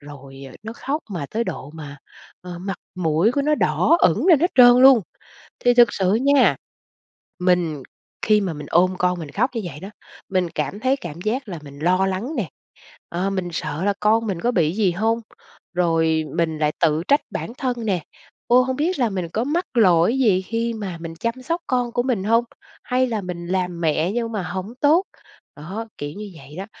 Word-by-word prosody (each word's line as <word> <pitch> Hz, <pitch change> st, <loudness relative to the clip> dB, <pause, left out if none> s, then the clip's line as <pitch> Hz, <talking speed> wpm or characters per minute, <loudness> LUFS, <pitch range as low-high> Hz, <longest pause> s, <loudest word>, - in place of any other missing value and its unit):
rồi, 140 Hz, -2 st, -12 dB
à, 130 Hz, -, -12 dB
nó 220 Hz, +1 st, -6 dB
khóc 285 Hz, +6 st, -3 dB
mà 170 Hz, -7 st, -4 dB
tới 230 Hz, +2 st, -1 dB
độ 140 Hz, -, -6 dB
mà, 145 Hz, -3 st, -9 dB, 0.4 s
ờ, 180 Hz, -1 st, -8 dB
mặt 190 Hz, +1 st, -4 dB, 0.2 s
mũi 170 Hz, +4 st, +2 dB
của 280 Hz, -, 0 dB
nó 300 Hz, +2 st, +2 dB
đỏ 330 Hz, -, +3 dB
ửng 205 Hz, -, +3 dB
lên 335 Hz, -7 st, +6 dB
hết 350 Hz, +3 st, +2 dB
trơn 245 Hz, -1 st, +8 dB
luôn. 265 Hz, -3 st, +8 dB, 0.6 s
Thì 245 Hz, 0 st, +5 dB
thực 240 Hz, -1 st, +6 dB
sự 190 Hz, 0 st, +1 dB
nha, 270 Hz, +3 st, +4 dB, 0.8 s
mình 175 Hz, -5 st, +1 dB, 0.4 s
khi 215 Hz, -1 st, +4 dB
mà 190 Hz, -4 st, -2 dB
mình 150 Hz, -1 st, -8 dB
ôm 185 Hz, +2 st, +3 dB
con 180 Hz, 0 st, +1 dB
mình 155 Hz, -4 st, -7 dB
khóc 250 Hz, +6 st, +1 dB
như 230 Hz, -, -1 dB
vậy 160 Hz, -4 st, -7 dB
đó, 190 Hz, -, -7 dB, 0.4 s
mình 185 Hz, -3 st, 0 dB
cảm 150 Hz, +8 st, -4 dB
thấy 260 Hz, +3 st, +2 dB
cảm 175 Hz, -, -8 dB
giác 225 Hz, +6 st, -2 dB
là 175 Hz, -4 st, -5 dB
mình 140 Hz, 0 st, -12 dB
lo 185 Hz, +5 st, +2 dB
lắng 195 Hz, +9 st, -3 dB
nè, 210 Hz, -9 st, -2 dB, 0.6 s
ờ, 180 Hz, +3 st, -2 dB
mình 185 Hz, -2 st, -2 dB
sợ 155 Hz, +1 st, -3 dB
là 205 Hz, -, +2 dB
con 225 Hz, +2 st, +3 dB
mình 190 Hz, -5 st, -3 dB
có 240 Hz, -, +1 dB
bị 165 Hz, -7 st, +2 dB
gì 200 Hz, -4 st, +2 dB
hông, 225 Hz, +5 st, 0 dB, 0.5 s
rồi 165 Hz, -2 st, +2 dB
mình 160 Hz, -2 st, 0 dB
lại 150 Hz, -1 st, +1 dB
tự 160 Hz, -1 st, +2 dB
trách 285 Hz, +1 st, +5 dB
bản -, -, -5 dB
thân 245 Hz, -4 st, -2 dB
nè, 190 Hz, -4 st, +1 dB, 0.5 s
ô, 250 Hz, +1 st, +5 dB
hông 260 Hz, 0 st, -2 dB
biết 330 Hz, +5 st, 0 dB
là 240 Hz, -4 st, +1 dB
mình 185 Hz, -3 st, -3 dB
có 220 Hz, +8 st, -2 dB
mắc 330 Hz, +7 st, 0 dB
lỗi 190 Hz, +1 st, +4 dB
gì 205 Hz, -8 st, +3 dB
khi 230 Hz, +4 st, -2 dB
mà 195 Hz, -6 st, -5 dB
mình 165 Hz, -1 st, -7 dB
chăm 230 Hz, +7 st, -3 dB
sóc 335 Hz, +7 st, -2 dB
con 245 Hz, -2 st, 0 dB
của 245 Hz, -, +1 dB
mình 240 Hz, -7 st, -1 dB
hông, 230 Hz, +3 st, +3 dB, 0.4 s
hay 255 Hz, +1 st, +1 dB
là 225 Hz, -4 st, -2 dB
mình 180 Hz, -2 st, -6 dB
làm 180 Hz, -1 st, -2 dB
mẹ 160 Hz, +2 st, +1 dB
nhưng 230 Hz, 0 st, -2 dB
mà 210 Hz, -3 st, -2 dB
hổng 185 Hz, +5 st, -5 dB
tốt? 315 Hz, +6 st, +4 dB, 0.5 s
Đó, 190 Hz, +10 st, -6 dB
kiểu 145 Hz, -, -4 dB
như 205 Hz, +3 st, -8 dB
vậy 150 Hz, -1 st, -13 dB
đó. 190 Hz, +2 st, -5 dB
195 Hz, 210 wpm, -22 LUFS, 170-240 Hz, 0.8 s, trơn